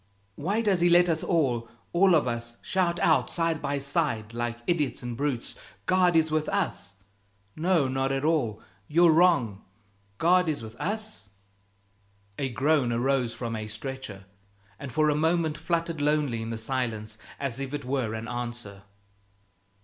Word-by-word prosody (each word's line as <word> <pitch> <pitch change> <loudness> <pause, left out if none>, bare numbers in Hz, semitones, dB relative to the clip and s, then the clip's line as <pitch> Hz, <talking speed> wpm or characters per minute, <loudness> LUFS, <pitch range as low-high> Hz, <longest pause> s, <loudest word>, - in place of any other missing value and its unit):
Why 200 - -1
does 195 -5 +2
He 175 - +5
let 175 +1 +6
us 160 -1 0
all 130 -10 +1 0.2
all 180 0 +5
of 145 -5 +2
us 120 0 -3
shout 175 -2 +1
out - - +3
side 165 -2 0
by 140 0 -1
side, 115 -5 -1
like 120 0 -2
idiots 150 -7 0
and 120 -1 -4
brutes, 135 -2 -2 0.3
'God 180 +3 +3
is 160 -1 +3
with 155 0 0
us!' 195 - -2 0.6
'No, 165 -3 +2
not 135 +1 0
at 135 +1 -1
all, 130 -10 0 0.2
you're 170 +2 +5
wrong; 155 - +3 0.5
God 180 +1 +4
is 145 -6 -2
with 110 0 -9
us'?" 215 - -3 1.1
A 135 -2 -1
groan 135 0 +2
arose 125 0 0
from 115 -2 -4
a 110 -1 -4
stretcher, 110 -3 -6 0.5
and 140 - -7
for 155 +2 +2
a 150 - +3
moment 160 0 +1
fluttered 165 0 -2
lonely 145 -6 +1
in 115 - -5
the 115 - -3
silence 110 -3 -3 0.2
as 135 -3 -2
if 135 -1 -4
it 145 -2 -4
were 125 -4 -1
an 110 +1 -5
answer. 120 -5 -6
140 Hz, 160 wpm, -27 LUFS, 120-165 Hz, 1.1 s, let